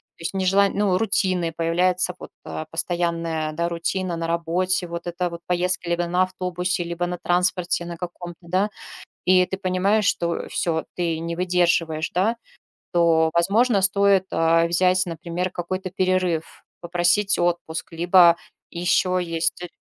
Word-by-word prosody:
то - - -19
есть - - -2
нежелань 195 +1 +2
ну, 200 -3 +2
рутины 185 -5 0
появляется, 180 +2 +1
вот, - - -9
а, 155 - -6
постоянная, 165 -2 -2
да, 170 +2 -1
рутина 175 +1 -2
на 165 0 -3
работе, 175 +2 0
вот 170 0 -6
эта 175 +1 -2
вот 170 0 -8
поездка 180 0 -1
либо 170 0 0
на 180 +2 +2
автобусе, 180 -1 -2
либо 170 +1 -3
на 180 - -4
транспорте 180 0 0
на 170 -1 -7
каком-то, 175 -1 -7
да. 190 +4 +1 0.6
И 185 0 +5
ты 190 - -4
понимаешь, 195 +3 +1
что 170 -3 0
всё, 160 -2 -1
ты 170 -2 -1
не 170 +1 -4
выдерживаешь, 170 -3 +1
да. 210 +6 +1 0.6
То, 165 -2 +3
возможно, 200 +5 +3
стоит, 195 0 +3
а, 165 +1 +3
взять, 185 +2 +3
например, 170 +2 -3
какой-то 185 +2 -4
перерыв, 185 -3 -1 0.2
попросить 175 +4 +1
отпуск. 175 -1 -2
Либо 170 0 +5 0.3
ещё 180 +1 +1
есть 165 0 -1
175 Hz, 145 wpm, -23 LUFS, 170-185 Hz, 0.6 s, И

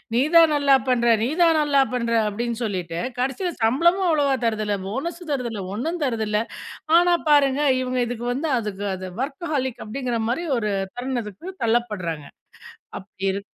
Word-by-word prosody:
"நீ 240 - +3
தான் 330 -1 +8
நல்லா 285 -1 +4
பண்ற. 240 -2 +2 0.2
நீ 230 - +1
தான் 330 -1 +5
நல்லா 290 -2 +3
பண்ற." 235 -2 -1 0.2
அப்டின்னு 230 +2 -3
சொல்லிட்டு, 180 -6 -3 0.2
கடைசியில 270 +8 -1
சம்பளமும் 340 +12 +3
அவ்வளவா 290 -4 +2
தரதில்ல. 215 -2 0
போனஸ் 305 - -4
தருதில்ல. 235 -7 -3
ஒண்ணும் 320 +10 -3
தரதில்ல. 220 -5 0 0.6
ஆனா 350 0 +4
பாருங்க 285 -1 +4 0.2
இவுங்க 255 0 -2
இதுக்கு 240 0 -5
வந்து 300 +5 -2
அதுக்கு 205 -2 -5
அது 185 0 -7
வொர்க்ஹாலிக் 275 -3 -3
அப்படிங்குற 245 +1 -3
மாரி 270 +9 -1
ஒரு 215 -3 -1 0.3
தருணதுக்கு 245 - -4
தள்ளப்படுறாங்க. 210 -10 -1 0.7
அப்படி 190 0 -8
இருக் 200 +1 -5
245 Hz, 145 wpm, -23 LUFS, 215-285 Hz, 0.7 s, தான்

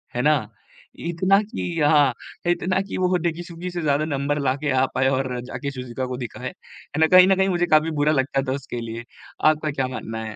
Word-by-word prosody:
है 125 - 0
ना, 150 +2 +4 0.6
इतना 185 +4 +2
कि 175 -5 -4
हाँ, 145 -3 +5 0.4
इतना 180 +2 +1
कि - - -3
वो 185 0 +2
डेकिसुगी 170 +1 -4
से 175 -1 -4
ज़्यादा 150 0 +1
नंबर 145 0 -1
लाके 140 +2 0
आ 130 0 +3
पाए 130 - +2
और 130 -2 -1
जाके 140 +2 -5
शिज़ूका 130 -1 -5
को 125 -1 -4
दिखाए, 120 -4 -6
है 150 - -13
ना? 160 - +6
कहीं 185 +1 +8
न 195 - +4
कहीं 190 +1 +2
मुझे 175 -1 +1
काफ़ी 160 +1 +3
बुरा 150 - +3
लगता 135 0 +1
था 130 - +1
उसके 130 -3 -5
लिए। 115 0 -6 0.5
आपका 155 0 -2
क्या 135 -2 -1
मानना 110 -3 -5
है? 110 - -7
145 Hz, 210 wpm, -23 LUFS, 130-170 Hz, 0.6 s, कहीं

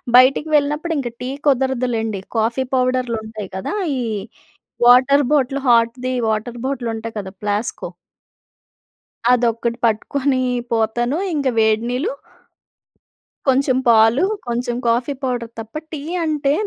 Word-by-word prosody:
బయటకి 265 +5 +5
వెళ్ళినప్పుడు 295 +3 +1
ఇంకా 245 -4 -3
టీ 250 - -3 0.2
కుదరదు 265 -2 +2
లెండి. 220 -3 -2 0.2
కాఫీ 230 +4 +1
పౌడర్‌లు 255 -2 +1
ఉంటాయి 215 -3 -7
కదా! 190 - -4 0.2
ఈ - - -2 0.9
వాటర్ 265 +3 +6
బాటిల్ 275 -1 +1
హాట్‌ది 240 +2 +2 0.2
వాటర్ 225 +2 -2
బాటిల్ 265 -3 -2
ఉంటాయి 225 0 -7
కదా! 190 -1 -7
ప్లాస్కో. 205 +2 -2 1.4
అదొక్కటి 235 -1 0
పట్టుకనీ 255 +4 0 0.3
పోతాను. 240 +5 0 0.2
ఇంక 280 -3 0
వేడి 220 +1 +3
నీళ్లు... 285 - -1 1.4
కొంచెం 265 0 +3
పాలు, 225 +5 +5 0.2
కొంచెం 240 0 -2
కాఫీ 240 +5 +1
పౌడర్ 245 -3 -2
తప్ప, 225 0 -9 0.2
టీ 310 -3 -5 0.2
అంటే, 295 -3 +1
245 Hz, 120 wpm, -20 LUFS, 225-270 Hz, 1.4 s, వాటర్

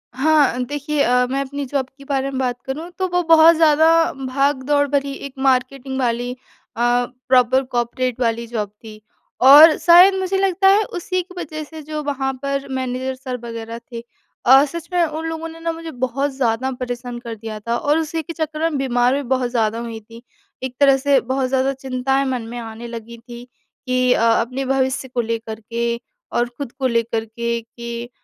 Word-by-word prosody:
हाँ, 285 -2 +3
देखिए 290 +2 -2
अ, 250 +1 +3
मैं 275 +1 0
अपनी 280 +1 -4
जॉब 270 0 -1
के 275 - -13
बारे 275 -1 -1
में 265 - -3
बात 245 -2 -2
करूँ 305 +6 -5
तो 375 - +1
वो 355 0 +1
बहुत 330 0 +7
ज़्यादा 315 0 +4 0.3
भाग-दौड़ 275 +1 0
भरी 280 0 0
एक 275 - -8
मार्केटिंग 265 0 0
वाली 245 0 -1
अ, 250 - -8 0.9
प्रॉपर 255 +1 +4
कॉपरेट 245 +1 -1
वाली 235 0 0
जॉब 215 -3 -3
थी। 215 +1 -14 0.4
और 295 +4 +9
शायद 350 +4 +7
मुझे 380 0 -1
लगता 385 0 +2
है 405 +2 +5
उसी 365 +1 -2
की 365 +1 -14
वजह 310 -2 -5
से 315 +1 -10
जो 305 +1 -5
वहाँ 270 -2 -2
पर 275 0 -2
मैनेजर 260 0 -3
सर 255 -1 -6
वग़ैरह 230 0 -6
थे 235 0 -6 0.4
अ, 265 +3 +8
सच 335 +2 -8
में 350 - +3
उन 315 +1 -5
लोगों 325 0 -5
ने 325 - -12
ना 330 0 -2
मुझे 330 0 -7
बहुत 260 +3 -2
ज़्यादा 255 0 0
परेशान 245 -1 -5
कर 235 -2 -7
दिया 215 0 -7
था 235 +3 -2
और 295 +5 +1
उसी 325 +1 -2
के 325 +2 -8
चक्कर 315 -2 -4
में 300 - -3
बीमार 250 -2 +1
भी 285 - -1
बहुत 255 -2 0
ज़्यादा 225 -1 0
हुई 230 -1 -6
थी। 230 +2 -15 0.4
एक 260 -1 -4
तरह 275 -1 +5
से 275 0 +3
बहुत 260 +1 -1
ज़्यादा 265 +1 +1
चिंताएँ 265 +1 -1
मन 255 -3 -2
में 240 - -7
आने 225 +1 -8
लगी 235 0 -8
थी 240 +1 -11 0.4
कि 255 0 +2
अ, - - 0
अपने 250 +4 -1
भविष्य 265 0 0
को 245 -1 -1
लेकर 225 -1 -4
के 235 +1 -3 0.3
और 240 0 +1
खुद 280 -5 -5
को 265 0 -2
लेकर 230 -1 -1
के 235 +1 -3
कि 235 +1 -8
260 Hz, 195 wpm, -20 LUFS, 240-290 Hz, 0.9 s, और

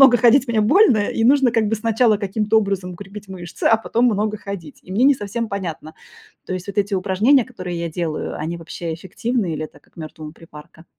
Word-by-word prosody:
много 265 -3 +8
ходить 245 +3 +5
мне 225 -2 +2
больно, 255 - +5
и 215 +2 0
нужно 270 0 +5
как 225 -2 +2
бы 225 - 0
сначала 225 0 +2
каким-то 210 +2 +1
образом 195 -3 -2
укрепить 200 +3 -10
мышцы, 175 -2 -8
а 225 - +6
потом 235 +2 0
много 215 -1 0
ходить. 200 -7 -8
И 185 - -10
мне 220 - +1
не 285 - +6
совсем 230 0 -4
понятно, 165 -5 -5 0.5
то - - -4
есть 185 +2 -6
вот 200 +1 -4
эти 200 0 +1
упражнения, 205 +8 +3
которые 185 -8 -6
я 170 - -2
делаю, 160 -1 -3
они 165 +3 -3
вообще 165 0 -6
эффективны 190 +3 -2
или 155 - -3
это 155 - -13
как - - -32
мёртвому 155 -1 -8
припарка? 160 0 -15
200 Hz, 210 wpm, -20 LUFS, 175-225 Hz, 0.5 s, много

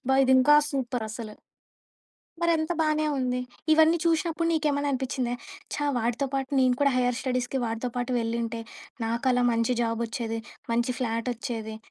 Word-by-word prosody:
అబ్బా! 265 +1 +1
ఇది 260 0 +4
ఇంకా 295 +3 +6 0.2
సూపర్ 250 -4 -2
అసలు. 215 -1 -7 1.1
మరి 340 0 +3
అంత 315 +2 -1
బానే 310 0 +2
ఉంది. 250 -1 0 0.3
ఇవన్నీ 320 +2 +6
చూశినప్పుడు 330 0 +1
నీకేమైనా 290 -2 +1
అనిపించిందా? 255 -2 -1 0.4
"ఛ! - - -3 0.2
వాడితో 240 +4 0
పాటు 270 0 -2
నేను 255 -1 +4
కూడా 280 -1 +4
హైయర్ 250 -1 +1
స్టడీస్‌కి 255 0 -1
వాడితో 230 +2 -3
పాటు 245 +1 -1
వెళ్ళింటే 230 0 -2 0.4
నాకు 235 +3 -2
అలా 245 0 +2
మంచి 230 +2 +1
జాబ్ 230 0 -1
ఓచ్చేది, 225 -1 -3 0.3
మంచి 240 +2 +1
ఫ్లాట్ 230 0 -1
ఓచ్చేది, 220 -2 -5
250 Hz, 155 wpm, -27 LUFS, 230-280 Hz, 1.1 s, ఇంకా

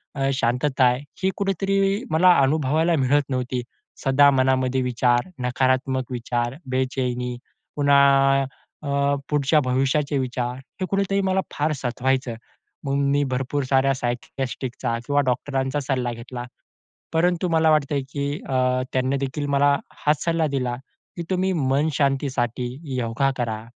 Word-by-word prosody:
अ, 135 -1 0
शांतता 130 +2 +1
आहे, 125 +1 +3 0.2
ही 190 - +3
कुठेतरी 195 +2 0
मला 180 +3 +6
अनुभवायला 155 +4 +2
मिळत 140 0 +2
नव्हती. 125 -1 -2 0.4
सदा 140 +1 +5
मनामध्ये 130 -1 +2
विचार, 120 +1 +1 0.2
नकारात्मक 130 0 0
विचार, 120 +1 -2
बेचैनी 125 -1 -2 0.4
पुन्हा 140 -1 +4 0.4
अ, 145 - -4 0.4
पुढच्या 150 +1 +3
भविष्याचे 135 +3 0
विचार 125 -1 -2 0.3
हे - - +1
कुठेतरी 195 0 +1
मला 190 0 +1
फार 150 +2 0
सतवायचं. 130 -1 -1 0.5
मग 135 - -1
मी 140 +1 +2
भरपूर 135 +3 -1
साऱ्या 135 +1 +2
सायकिअ‍ॅट्रिकचा 125 -1 -3
किंवा 145 0 +2
डॉक्टरांचा 135 +2 -1
सल्ला 130 -3 -1
घेतला. 120 +1 -7 0.7
परंतु 175 +2 +1
मला 160 -1 +3
वाटतंय, 145 -2 +2
की 140 0 -3
अ, 130 -1 +1
त्यांनीदेखील 135 +2 -1
मला 145 +1 +4 0.4
हाच 150 0 +2
सल्ला 165 -1 +1
दिला, 125 -2 -1 0.4
की 170 - -3
तुम्ही 185 +1 +1
मनशांतीसाठी 135 -4 0 0.3
योगा 125 +3 0
करा, 110 -3 -3
135 Hz, 125 wpm, -23 LUFS, 125-145 Hz, 0.7 s, मला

